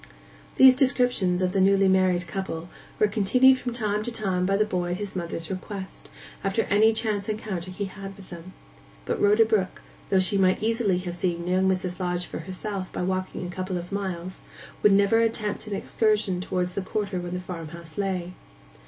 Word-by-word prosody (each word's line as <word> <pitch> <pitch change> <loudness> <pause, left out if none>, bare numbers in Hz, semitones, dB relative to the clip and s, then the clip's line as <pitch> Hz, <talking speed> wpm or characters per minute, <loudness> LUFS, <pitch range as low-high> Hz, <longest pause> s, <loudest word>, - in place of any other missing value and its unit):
These 260 -1 +9
descriptions 245 -8 +2
of 180 - +1
the 195 0 +1
newly 195 0 +4
married 185 -2 +3
couple 170 -1 -5 0.3
were 210 - +4
continued 250 +6 +4
from 245 - -3
time 210 -3 -1
to 240 - -3
time 190 -5 -1
by 195 0 +2
the 215 - +3
boy 180 -3 -2
at - - -3
his 205 -1 -5
mother's 170 -1 -4
request, 190 +1 -7 0.3
after 195 +3 +1
any 215 +2 +4
chance 220 -2 -1
encounter 210 -5 -4
he 185 +2 -4
had 195 +1 -10
had 195 0 -7
with 190 -2 -14
them. 175 +2 -10 0.5
But - - -2
Rhoda 210 +2 +5
Brook, 210 -4 -1 0.3
though 190 - +4
she 195 +2 +2
might 185 +1 +3
easily 225 -4 +1
have 180 -1 -5
seen 175 -1 -1
young 185 +1 +2
Mrs. 185 -1 -2
Lodge 180 -1 -1
for - - -7
herself 190 0 -5
by - - -3
walking 185 0 -2
a 175 - -5
couple 185 0 -3
of 175 +1 -7
miles, 185 -2 -4 0.4
would 210 - +6
never 200 +3 +4
attempt 220 -2 -1
an 205 - -3
excursion 210 -3 0
towards 180 -1 -2
the 200 - -2
quarter 195 0 -3
where 175 0 -5
the 180 +1 -3
farmhouse 170 -2 -8
lay. 185 -3 -2
190 Hz, 195 wpm, -26 LUFS, 180-210 Hz, 0.5 s, These